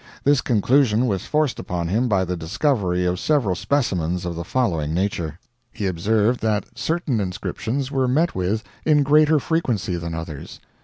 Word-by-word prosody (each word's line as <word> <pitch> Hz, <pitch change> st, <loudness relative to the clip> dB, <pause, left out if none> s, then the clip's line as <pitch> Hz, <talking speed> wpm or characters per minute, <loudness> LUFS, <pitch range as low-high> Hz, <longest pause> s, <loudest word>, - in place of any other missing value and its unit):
This 145 Hz, -1 st, +4 dB
conclusion 120 Hz, +1 st, +3 dB
was 100 Hz, -6 st, -2 dB
forced 150 Hz, -4 st, 0 dB
upon 85 Hz, -2 st, -3 dB
him 110 Hz, +8 st, +1 dB
by 95 Hz, -4 st, +2 dB
the 90 Hz, 0 st, -2 dB
discovery 90 Hz, -, 0 dB
of 90 Hz, 0 st, 0 dB
several 140 Hz, -11 st, +1 dB
specimens 90 Hz, -, -1 dB
of 85 Hz, -, -2 dB
the 85 Hz, -, -4 dB
following 85 Hz, -9 st, -1 dB
nature: 85 Hz, -4 st, -2 dB, 0.3 s
He 105 Hz, -, -4 dB
observed 105 Hz, +6 st, +1 dB
that 110 Hz, -2 st, 0 dB
certain 160 Hz, -8 st, -1 dB
inscriptions 110 Hz, +7 st, -3 dB
were 135 Hz, -2 st, +1 dB
met 160 Hz, +7 st, +2 dB
with 95 Hz, +5 st, -1 dB, 0.2 s
in 150 Hz, -2 st, +4 dB
greater 150 Hz, +2 st, +5 dB
frequency 120 Hz, -, -1 dB
than 85 Hz, -1 st, -4 dB
others. 80 Hz, -3 st, -7 dB
105 Hz, 160 wpm, -22 LUFS, 90-135 Hz, 0.3 s, greater